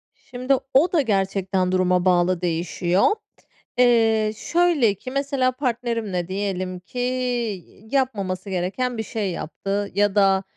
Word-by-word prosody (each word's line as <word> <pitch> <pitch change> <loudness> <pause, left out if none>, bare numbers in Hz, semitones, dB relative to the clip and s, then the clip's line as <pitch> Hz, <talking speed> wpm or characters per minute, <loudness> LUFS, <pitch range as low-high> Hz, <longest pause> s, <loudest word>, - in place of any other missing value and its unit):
Şimdi 255 +1 -2 0.2
o 315 +7 +4
da 320 - +4
gerçekten 195 -4 0
duruma 180 -1 +2
bağlı 180 0 +3
değişiyor. 175 +2 +1 0.7
Eee, 225 -3 +4
şöyle 330 - +2
ki, 255 +6 -8
mesela, 275 -2 0
partnerimle 235 -8 -2
diyelim 185 -1 -3
ki 205 +7 -9 0.9
yapmaması 200 -8 -1
gereken 195 +7 -2
bir 220 - -2
şey 205 -3 -3
yaptı 195 +5 -4
ya 205 0 +2
da, 195 -1 +4
205 Hz, 120 wpm, -23 LUFS, 185-250 Hz, 0.9 s, o